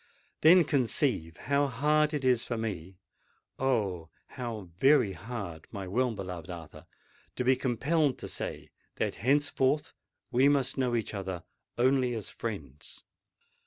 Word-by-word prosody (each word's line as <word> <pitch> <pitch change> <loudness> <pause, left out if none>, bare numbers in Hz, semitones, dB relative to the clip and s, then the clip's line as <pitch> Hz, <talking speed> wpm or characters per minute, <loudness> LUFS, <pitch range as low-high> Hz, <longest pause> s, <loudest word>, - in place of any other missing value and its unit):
Then, 175 +3 +8
conceive 125 - +1
how 140 +1 +1
hard 150 +4 +2
it 145 -4 -2
is 125 -2 +3
for 120 - -3
me—oh! 95 0 -4 0.2
how 115 -7 -6
very 135 -8 +5
hard, 95 -4 -7
my 95 -2 -6
well 125 +6 +1
beloved 90 -4 -6
Arthur, 80 -1 -9 0.5
to 125 - -1
be 130 +1 +4
compelled 140 +4 +1
to - - -7
say - - -5 0.2
that - - -1
henceforth 140 +2 +1 0.4
we 130 +4 +5
must 140 -3 +2
know 125 -3 0
each 115 -2 -2
other 95 -3 -4 0.3
only 125 0 +2
as 110 -3 -5
friends!" 75 - -7
120 Hz, 130 wpm, -30 LUFS, 95-135 Hz, 0.5 s, Then